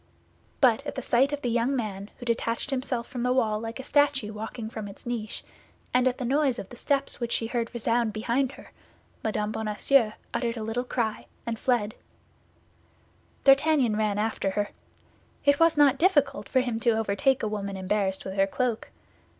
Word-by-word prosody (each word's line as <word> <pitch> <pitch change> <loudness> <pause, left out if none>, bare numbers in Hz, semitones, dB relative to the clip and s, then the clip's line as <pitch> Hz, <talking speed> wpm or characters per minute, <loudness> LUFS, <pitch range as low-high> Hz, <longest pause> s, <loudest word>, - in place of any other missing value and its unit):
But 255 -1 +5
at - - -4
the 265 - -4
sight 260 +4 +3
of 290 0 -4
the 245 - 0
young 240 +4 +1
man, 205 -4 -4
who 245 - -9
detached 230 +3 -1
himself 255 -3 -1
from 250 -2 -6
the 250 +1 +1
wall 220 -5 +2
like 225 +3 -6
a - - -5
statue 280 -7 +2
walking 220 +1 -6
from 220 -2 -6
its 200 - -12
niche, 230 -3 -4 0.5
and 250 +1 +4
at 255 - 0
the 255 - -3
noise 270 0 +2
of 195 - -7
the - - -10
steps 275 +2 0
which 235 -1 -3
she 230 - 0
heard 230 0 -2
resound 235 -1 +1
behind 240 +5 0
her, - - -14 0.5
Mme. 210 -1 -1
Bonacieux 220 +2 +2 0.2
uttered 235 -1 -1
a 220 - -4
little 230 +3 -2
cry 235 -3 -2 0.2
and 230 -1 -3
fled. 230 -5 +1 1.5
D'Artagnan 275 -4 +5
ran 210 -1 0
after 215 -2 0
her. 205 +1 -1 0.8
It 285 0 +4
was 330 -2 +4
not 280 -2 +5
difficult 290 -6 +2
for 260 - +3
him 240 -3 -2
to 230 -1 +2
overtake 225 +5 +1
a - - +1
woman 200 -2 -3
embarrassed 190 0 -1
with 190 - -4
her 195 0 +4
cloak. 235 +2 -2
235 Hz, 185 wpm, -27 LUFS, 215-265 Hz, 1.5 s, But